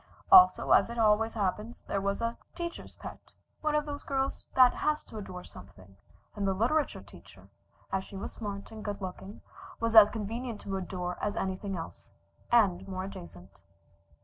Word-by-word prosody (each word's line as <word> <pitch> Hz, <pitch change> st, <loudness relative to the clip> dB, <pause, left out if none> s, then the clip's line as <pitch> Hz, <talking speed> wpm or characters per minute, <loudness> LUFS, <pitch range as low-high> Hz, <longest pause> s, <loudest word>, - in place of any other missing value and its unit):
Also, 370 Hz, -1 st, +8 dB
as -, -, +6 dB
always 225 Hz, -1 st, +2 dB
happens, 210 Hz, +3 st, -2 dB
there 200 Hz, -, -2 dB
was 200 Hz, +3 st, -1 dB
a 230 Hz, 0 st, -1 dB, 0.2 s
"teacher's 340 Hz, -1 st, -6 dB
pet," -, -, -9 dB, 0.4 s
one 305 Hz, -1 st, 0 dB
of 300 Hz, 0 st, +1 dB
those 290 Hz, -1 st, -5 dB
girls 270 Hz, -1 st, -2 dB
that 255 Hz, -1 st, +7 dB
has 305 Hz, 0 st, 0 dB
to 220 Hz, -, -9 dB
adore 180 Hz, -3 st, -8 dB
something, 95 Hz, 0 st, -14 dB, 0.4 s
and 200 Hz, -2 st, -1 dB
the 190 Hz, -, +1 dB
literature 270 Hz, +10 st, 0 dB
teacher, -, -, -16 dB, 0.4 s
as 190 Hz, -, 0 dB
she 195 Hz, -, -12 dB
was 195 Hz, -, -6 dB
smart 200 Hz, -2 st, -6 dB
and 220 Hz, -1 st, -9 dB
good 205 Hz, -1 st, -4 dB
looking, 190 Hz, +1 st, -8 dB, 0.4 s
was 230 Hz, 0 st, -1 dB
as 215 Hz, -2 st, +10 dB
convenient 225 Hz, +1 st, -4 dB
to 195 Hz, -, -4 dB
adore 180 Hz, -1 st, -4 dB
as 205 Hz, -, -1 dB
anything 190 Hz, 0 st, -3 dB
else, 165 Hz, -, -9 dB, 0.4 s
and 195 Hz, -5 st, +3 dB
more 185 Hz, -1 st, -4 dB
adjacent. 100 Hz, -, -10 dB
205 Hz, 170 wpm, -30 LUFS, 190-235 Hz, 0.4 s, as